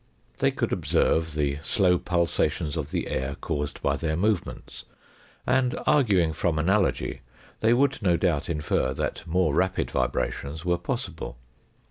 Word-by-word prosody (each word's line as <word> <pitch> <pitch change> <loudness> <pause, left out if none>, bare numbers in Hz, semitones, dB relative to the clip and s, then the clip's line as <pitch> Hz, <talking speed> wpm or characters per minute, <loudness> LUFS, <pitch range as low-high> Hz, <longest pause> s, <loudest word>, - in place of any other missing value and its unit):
They - - +4
could - - -1
observe 80 -1 +1
the 70 -1 0
slow 90 +1 +2
pulsations 85 -3 0
of 75 -3 -3
the - - -2
air 65 +1 -2
caused 75 0 -3
by - - +1
their 80 -1 -1
movements, 105 0 -2 0.6
and 130 -1 +2
arguing 100 - +3
from 80 0 0
analogy, 95 +5 +1 0.4
they 110 - +3
would 135 0 +2
no 90 -4 +3
doubt 85 -6 0
infer 75 -4 0
that - - -2
more 85 -2 +2
rapid 95 +4 0
vibrations 75 +4 -2
were 90 -1 +1
possible. 60 - -4
85 Hz, 140 wpm, -26 LUFS, 75-95 Hz, 0.6 s, They